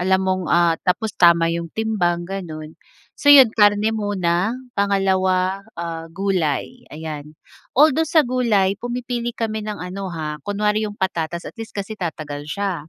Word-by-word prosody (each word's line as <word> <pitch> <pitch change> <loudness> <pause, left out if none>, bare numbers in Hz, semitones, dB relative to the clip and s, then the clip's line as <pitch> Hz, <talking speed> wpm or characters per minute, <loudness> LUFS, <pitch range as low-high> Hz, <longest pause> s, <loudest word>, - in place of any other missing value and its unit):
Alam 190 +1 +2
mong 185 -1 0
ah, 170 -1 +4
tapos 210 +3 -1
tama 170 -1 +4
'yong 170 0 -3
timbang, 180 -6 0
gano'n. 160 -5 -7 0.4
So 290 - -2
'yon, 265 -6 +9
karne 205 +1 +3
muna, 205 0 0 0.2
pangalawa 190 -2 +1 0.2
ah 165 -1 -5
gulay, 190 - -2
ayan. 150 -1 -8 0.4
Although 310 +2 +4
sa 315 -4 +4
gulay, 230 -6 +2
pumipili 240 -1 -4
kami 220 -1 -2
ng 210 -1 -5
ano 190 +2 -6
ha, 155 -3 -5
kunwari 210 +1 0
'yong 205 - -10
patatas 170 -3 -2
at - - -7
least 220 - -8
kasi 200 +2 -4
tatagal 150 -6 -5
siya, 180 -5 -3
190 Hz, 150 wpm, -21 LUFS, 170-215 Hz, 0.4 s, yon